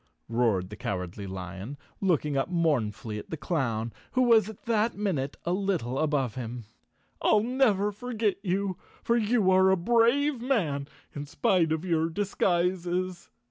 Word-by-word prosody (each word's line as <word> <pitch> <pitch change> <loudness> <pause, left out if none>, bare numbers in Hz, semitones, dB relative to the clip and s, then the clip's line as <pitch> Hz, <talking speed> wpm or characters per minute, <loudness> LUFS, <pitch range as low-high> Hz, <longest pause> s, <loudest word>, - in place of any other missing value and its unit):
roared 110 -6 +1
the - - -6
Cowardly 95 0 -4
Lion, 95 +7 -6 0.2
looking 155 -6 +1
up 135 +4 0
mournfully 125 - 0
at - - -11
the 160 - -4
clown, 120 - -1 0.2
who 255 - +3
was 225 -4 +5
at 220 - -11
that 230 0 +1
minute 155 -10 -1
a 170 - 0
little 180 -10 -1
above 145 -7 +1
him. 120 -2 -6 0.6
"I'll 215 -1 +4
never 225 -5 +2
forget 220 -2 -1
you, 190 -1 -1 0.3
for 235 - +2
you 220 -3 +3
are 190 0 +5
a 190 - +4
brave 235 +7 +3
man 165 - 0 0.3
in 145 0 -6
spite 180 -1 +2
of 160 +2 -1
your 165 -2 +1
disguises." 180 -1 -1
175 Hz, 150 wpm, -28 LUFS, 135-210 Hz, 0.6 s, was